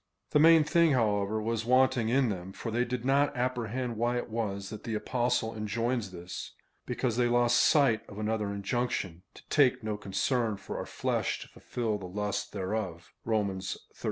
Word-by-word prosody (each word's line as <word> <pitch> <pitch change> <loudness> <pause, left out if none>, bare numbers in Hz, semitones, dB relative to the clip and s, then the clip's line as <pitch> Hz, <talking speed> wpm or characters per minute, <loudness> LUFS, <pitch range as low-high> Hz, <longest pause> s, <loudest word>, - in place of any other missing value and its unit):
The 150 - +4
main 165 0 +7
thing, 165 0 +4
however, 105 -3 +1
was 115 +1 -1
wanting 130 -1 +3
in 130 0 +3
them, 95 -1 -5
for 115 - -5
they 120 +2 +2
did 125 0 -4
not 140 0 +2
apprehend 125 -1 -2
why 120 +2 +1
it 120 - -4
was 100 -4 -3
that 110 -1 -7
the 115 -2 -3
Apostle 120 0 0
enjoins 115 +1 -1
this, 90 0 -7 0.3
because 125 -1 -1
they 120 -1 +3
lost 120 0 +3
sight 130 -8 +4
of 100 - -10
another 110 -1 -1
injunction 100 -4 -2
— - - -47
to - - -15
take 135 -6 +3
no 110 -1 -2
concern 105 +3 0
for 95 - -6
our - - -5
fie - - -1
sh - - -2
to - - -10
fulfil 110 -4 -3
the 95 - -7
lusts 105 +2 -2
thereof 95 -3 -4
(Rom. 105 -4 0
xiii. 95 - -4
115 Hz, 185 wpm, -30 LUFS, 105-125 Hz, 0.3 s, main